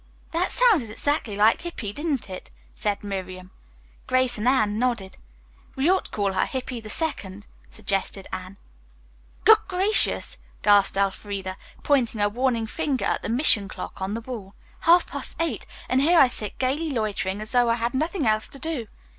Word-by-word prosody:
"That 340 +3 0
sounded 430 - +4
exactly 235 -1 -1
like 215 +2 +4
Hippy, 250 -12 -5
didn't 295 -5 -2
it?" 185 -1 -8 0.2
said 205 -1 -2
Miriam. 185 -2 -6 0.6
Grace 255 -2 +2
and 220 - -1
Anne 215 -5 +2
nodded. 230 -6 -1 0.6
"We 280 +7 +3
ought 380 - +1
to - - -9
call 200 -2 -1
her 185 - +1
Hippy 255 -2 -4
the 215 - -10
Second," 210 - -3 0.2
suggested 195 -2 -2
Anne. 185 +1 -6 0.9
"Good 440 0 +8
gracious!" 390 +3 +2 0.2
gasped 205 -2 +5
Elfreda, 195 -1 -2 0.3
pointing 250 -6 +1
a 205 0 +3
warning 235 0 0
finger 265 +4 -2
at - - 0
the - - -4
mission 230 -5 +3
clock 190 - -8
on 195 +3 -2
the 230 - -4
wall. 220 -5 -8 0.2
"Half 345 +2 +5
past - - -5
eight, 330 0 -2 0.2
and 260 +1 +2
here 335 +5 +4
I 270 - +8
sit 210 -4 -5
gayly 280 +5 0
loitering 210 -6 -2
as 215 0 -7
though 245 -1 +3
I 230 - +3
had 235 0 -2
nothing 315 +3 -1
else 215 0 +2
to - - -10
do. 285 -6 -4
230 Hz, 170 wpm, -25 LUFS, 205-280 Hz, 0.9 s, Good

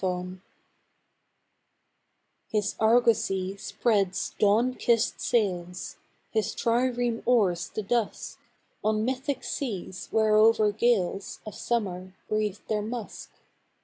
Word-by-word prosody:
ARGONAUT 180 0 -2 2.1
His 210 -2 -1
argosy 220 -4 +2
spreads 200 -3 0
dawn 220 +5 +3
kissed 235 -2 +1
sails, 180 -6 -1 0.3
His 220 -1 -1
trireme 240 0 0
oars 195 -9 +2
the 215 - -4
dusk, 230 +2 -2 0.4
On 215 0 +1
mythic 265 +2 -2
seas 195 -7 -4
whereover 215 0 +4
gales 205 -3 0
Of 215 - -7
summer 185 -5 -3
breathe 215 -2 -1
their 215 -1 0
musk. 225 0 -6
215 Hz, 95 wpm, -27 LUFS, 190-235 Hz, 2.1 s, whereover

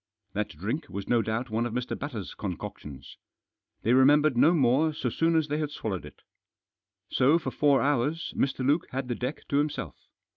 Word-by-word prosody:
That 105 0 -2
drink 110 - -4
was 100 0 -6
no 120 -1 +3
doubt 110 +2 -3
one 115 +2 0
of 115 - -7
Mr. 125 +1 -2
Batters' 125 -9 -6
concoctions. 75 -7 -7 0.7
They 115 - +3
remembered 145 +2 +5
no 150 +7 +5
more 150 0 +3
so 125 -5 -2
soon 165 +5 +1
as 160 -2 +2
they 150 +1 -1
swallowed 110 -10 -4
it. - - -16 0.9
So 135 +5 +4
for 170 - -4
four 145 -2 +3
hours 145 +3 0
Mr. 135 -1 0
Luke 145 +5 +2
had 130 0 -4
the 120 - -1
deck 125 +5 -5
to 140 - +1
himself. 145 0 -3
130 Hz, 180 wpm, -28 LUFS, 115-150 Hz, 0.9 s, remembered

